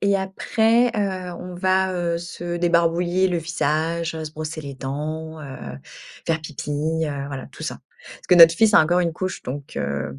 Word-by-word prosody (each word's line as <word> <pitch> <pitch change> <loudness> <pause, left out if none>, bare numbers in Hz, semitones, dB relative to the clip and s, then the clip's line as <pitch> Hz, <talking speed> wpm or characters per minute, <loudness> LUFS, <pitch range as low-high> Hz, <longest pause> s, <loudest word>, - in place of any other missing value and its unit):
et 200 0 +3
après, 220 +5 +2
heu, 185 -3 -2
on 180 0 -8
va, 185 +1 +2
heu, 170 -1 -1
se 175 0 -5
débarbouiller 175 +2 +2
le 175 - 0
visage, 165 0 -1
heu, 160 0 -4
se 150 - -7
brosser 155 +1 -5
les 140 -1 -7
dents, 155 +4 -5
heu, 100 - -8 0.5
faire 165 -1 +1
pipi, 150 -1 -7 0.3
heu, 140 -2 -3
voilà 135 -2 -6
tout - - -10
ça. - - -4 0.3
Parce - - -14
que 180 - +7
notre 165 -1 +9
fils 220 +3 +4
a - - +9
encore 175 +3 +3
une 170 -2 0
couche, 185 +2 -4
donc, 140 +2 -7
heu, 70 -1 -3
170 Hz, 190 wpm, -23 LUFS, 155-180 Hz, 0.5 s, notre